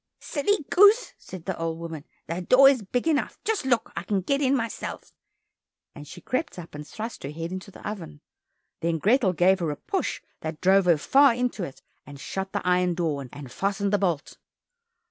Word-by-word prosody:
"Silly 310 +2 -1
goose," 410 +6 +6
said 185 -3 -10
the 190 - -2
old 165 -1 -2
woman, 165 -3 -7 0.2
"The 170 +3 -4
door 255 +9 +7
is 270 -4 +4
big 245 +8 -2
enough; 305 -3 0
just 430 -9 -1
look, 240 -3 +1
I - - -2
can 190 +2 -1
get 275 +10 0
in 270 0 +3
myself!" 230 -3 -4 0.8
and 145 -2 -11
she 175 - -11
crept 255 - -2
up 170 -2 -9
and 150 0 -8
thrust 225 +2 -6
her 135 - -5
head 165 +3 -5
into 185 0 -6
the - - -10
oven. 185 - -7 0.6
Then 165 0 0
Grethel 210 - +3
gave 185 +3 +4
her 170 -3 -1
a 145 - -2
push 385 - -2 0.2
that 155 -1 -5
drove 190 +1 +4
her 170 -3 +5
far 270 - +5
into 245 -5 -1
it, 140 -6 -8 0.2
and 145 -1 -12
shut 190 +7 -4
the - - -3
iron 180 -1 +2
door, 155 -5 -1
and 140 -4 -10
fastened 200 +1 -1
the 205 - +3
bolt. 170 -7 -1
185 Hz, 200 wpm, -26 LUFS, 165-245 Hz, 0.8 s, door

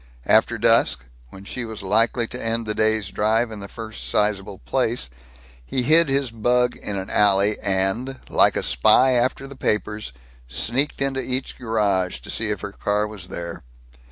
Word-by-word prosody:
After - - +3
dusk, 65 0 +2 0.2
when 95 +6 -13
she 125 - -5
was 110 -3 -7
likely 115 +4 +2
to - - -6
end 115 0 -1
the 105 - -2
day's 110 -2 0
drive 110 +3 0
in 110 - -7
the 100 - -7
first 110 0 -6
sizable 100 -2 0
place, 120 - -2 0.5
he 125 - -2
hid 160 +3 +5
his 135 -2 +1
bug 120 +2 +1
in 105 - -4
an 95 -1 -5
alley 100 0 +3
and, 100 +7 0
like - - +4
a - - -1
spy 125 - +4
after 125 +2 0
the 140 0 -10
papers, 105 - -2 0.4
sneaked 125 - -1
into 135 -1 -1
each 130 +1 -3
garage 100 - -1
to - - -8
see 110 -1 -1
if 105 - -3
her 100 - -6
car 105 +1 -1
was 105 -2 -8
there. 85 -1 -7
110 Hz, 175 wpm, -22 LUFS, 100-125 Hz, 0.5 s, hid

